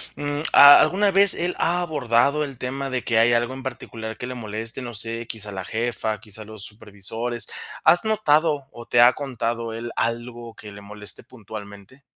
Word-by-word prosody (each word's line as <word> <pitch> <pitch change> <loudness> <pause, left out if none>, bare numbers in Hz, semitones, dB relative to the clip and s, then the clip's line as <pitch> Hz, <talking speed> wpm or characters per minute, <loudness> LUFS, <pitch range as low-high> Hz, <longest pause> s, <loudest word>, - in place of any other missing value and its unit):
Mm, 145 0 -3
ah, 145 0 +10
¿alguna 195 +6 +2
vez 195 +1 +6
él 175 +1 -1
ha 175 +1 +2
abordado 140 -2 +1
el 140 -3 -7
tema 135 +2 -4
de 130 -2 -3
que 115 -2 +1
hay 120 +1 +4
algo 120 +2 0
en 130 - -8
particular 110 -4 -7
que 125 - -6
le 125 - -5
moleste?, 115 +1 -6
no 120 -1 -7
sé, 115 +1 0
quizá 105 -3 -3
la 95 -1 -6
jefa, 110 -2 -2
quizá 110 +1 -9
los 110 -1 -6
supervisores. 110 +3 -4 0.4
¿Has 175 - +5
notado 155 -9 +1
o 120 - -11
te 120 - +2
ha 120 +1 +7
contado 115 -4 -4
él 115 +1 -6
algo 120 0 -4
que 105 - -11
le 100 0 -12
moleste 105 0 -3
puntualmente? 110 +1 -12
120 Hz, 185 wpm, -22 LUFS, 110-140 Hz, 0.4 s, ah